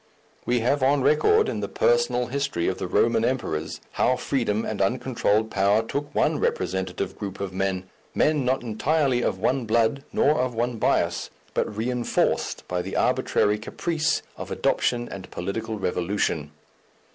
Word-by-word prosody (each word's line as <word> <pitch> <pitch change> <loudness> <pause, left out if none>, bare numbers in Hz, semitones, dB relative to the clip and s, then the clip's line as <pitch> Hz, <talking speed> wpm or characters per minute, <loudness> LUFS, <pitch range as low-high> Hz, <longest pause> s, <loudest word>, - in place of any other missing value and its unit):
We 120 -1 +2
have 135 +4 +1
on 135 +1 +3
record, 290 - +4
in - - -2
the - - -2
personal 475 - +2
history 135 -9 -1
of - - -1
the - - -3
Roman 115 -1 +2
emperors, 80 -12 -2
how 130 - +2
freedom 120 -4 -1
and 105 -2 -3
uncontrolled 110 -1 +1
power 100 +3 +3
took 140 +5 -4
one - - +2
representative 95 -1 -2
group 100 -2 -5
of 100 -2 -4
men, 95 -1 -1 0.3
men 150 -3 +2
not 130 +1 0
entirely 130 +3 +1
of 95 - 0
one 125 +5 0
blood 115 +4 +2
nor 145 -1 +3
of 125 -2 -2
one 120 +1 -1
bias, - - +1 0.2
but 105 - -1
reinforced 120 +2 0
by 90 0 -1
the - - -6
arbitrary 105 0 +2
caprice 160 +8 -1
of - - -7
adoption 120 -1 0
and 95 -1 -8
political 110 +5 -4
revolution. 90 -5 -1
115 Hz, 155 wpm, -25 LUFS, 100-130 Hz, 0.3 s, record